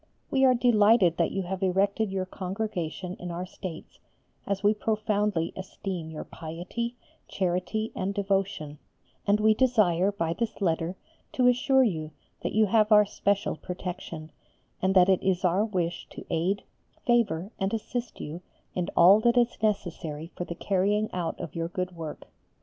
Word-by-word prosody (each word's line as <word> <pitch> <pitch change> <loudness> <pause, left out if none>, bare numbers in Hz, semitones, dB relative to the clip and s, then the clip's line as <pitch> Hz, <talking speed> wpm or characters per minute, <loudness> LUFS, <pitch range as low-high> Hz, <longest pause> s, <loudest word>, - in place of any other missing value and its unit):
We 270 -1 +3
are 255 -1 +6
delighted 215 -7 +4
that - - +2
you 195 - -2
have 190 +2 -4
erected 195 +2 +1
your 190 -1 -1
Congregation 185 -2 -4
in 180 - -6
our 175 +1 -4
States, 180 -3 -9 0.5
as 200 0 -1
we 205 +1 +5
profoundly 210 -5 0
esteem 185 -3 -5
your 155 -1 -6
piety, 180 +9 -5 0.3
charity, 190 +4 -1
and 190 +1 -1
devotion, 195 -7 -1 0.5
and 205 +1 +4
we 215 +1 +5
desire 210 -7 +3
by 165 -5 -1
this 230 +4 -3
letter 170 -1 0 0.4
to 250 - +2
assure 265 +2 +4
you 160 -9 -1 0.3
that - - -3
you 215 0 +4
have 215 +1 +3
our 210 0 +8
special 200 0 0
protection, 175 -2 -6 0.5
and 190 +1 +2
that 180 -1 +7
it 190 -2 +3
is 185 -1 +1
our 180 +4 +3
wish 175 -5 -2
to - - -10
aid, 185 +5 0 0.4
favour, 225 -6 +2
and 195 0 0
assist 235 +1 -4
you 160 +4 -6 0.3
in 180 -1 -2
all 185 +5 +8
that 235 +2 +3
is 240 -1 +3
necessary 170 -6 -2
for 175 - -4
the 170 - -6
carrying 205 +4 +1
out 175 -2 -3
of 170 -3 -6
your 165 0 -2
good 180 +1 -4
work. 160 -2 -7
190 Hz, 160 wpm, -27 LUFS, 175-215 Hz, 0.5 s, our